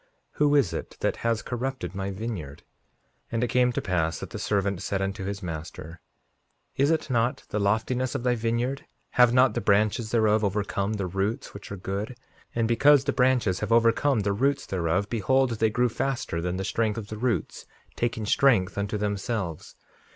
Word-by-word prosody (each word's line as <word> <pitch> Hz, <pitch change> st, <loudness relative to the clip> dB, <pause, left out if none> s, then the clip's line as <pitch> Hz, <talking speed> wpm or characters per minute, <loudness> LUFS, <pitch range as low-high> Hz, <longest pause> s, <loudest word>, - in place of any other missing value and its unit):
Who 145 Hz, 0 st, +5 dB
is 140 Hz, -, +3 dB
it -, -, -6 dB
that -, -, 0 dB
has 115 Hz, -1 st, -1 dB
corrupted 125 Hz, -7 st, -4 dB
my 95 Hz, 0 st, -3 dB
vineyard? 95 Hz, -9 st, -6 dB, 0.7 s
5:48 -, -, -13 dB
And 115 Hz, +1 st, +1 dB
it -, -, +2 dB
came 125 Hz, 0 st, +3 dB
to -, -, -3 dB
pass 85 Hz, -4 st, 0 dB
that -, -, -8 dB
the -, -, -5 dB
servant 100 Hz, -2 st, 0 dB
said 100 Hz, 0 st, -2 dB
unto 95 Hz, 0 st, -3 dB
his 100 Hz, 0 st, -4 dB
master: 80 Hz, 0 st, -7 dB, 0.7 s
Is 140 Hz, +2 st, +3 dB
it 160 Hz, -4 st, 0 dB
not 120 Hz, +1 st, +1 dB
the 105 Hz, -, -1 dB
loftiness 115 Hz, +5 st, 0 dB
of -, -, -2 dB
thy 125 Hz, -1 st, +2 dB
vineyard—have 120 Hz, +1 st, 0 dB
not 125 Hz, -1 st, +4 dB
the -, -, -2 dB
branches 110 Hz, +2 st, +2 dB
thereof 110 Hz, -2 st, +3 dB
overcome 100 Hz, 0 st, -1 dB
the 100 Hz, -3 st, -2 dB
roots 95 Hz, +5 st, -2 dB
which 100 Hz, 0 st, -10 dB
are 100 Hz, -, -4 dB
good? 100 Hz, +6 st, -4 dB, 0.4 s
And 115 Hz, -1 st, +1 dB
because 135 Hz, +4 st, +5 dB
the -, -, -1 dB
branches 125 Hz, -7 st, +2 dB
have 105 Hz, +1 st, -3 dB
overcome 115 Hz, +2 st, +3 dB
the 100 Hz, 0 st, 0 dB
roots 135 Hz, +7 st, +1 dB
thereof, 90 Hz, +2 st, 0 dB
behold 125 Hz, +4 st, +2 dB
they 110 Hz, -1 st, +1 dB
grew 125 Hz, +3 st, +2 dB
faster 120 Hz, -8 st, -2 dB
than 90 Hz, +1 st, -2 dB
the 95 Hz, -, -3 dB
strength 110 Hz, +1 st, 0 dB
of 105 Hz, -3 st, -6 dB
the 110 Hz, -, -5 dB
roots, 115 Hz, -8 st, -2 dB, 0.3 s
taking 115 Hz, -2 st, -1 dB
strength 100 Hz, -5 st, +3 dB
unto 100 Hz, +1 st, -2 dB
themselves. 100 Hz, -4 st, -3 dB
110 Hz, 185 wpm, -26 LUFS, 100-125 Hz, 0.7 s, Who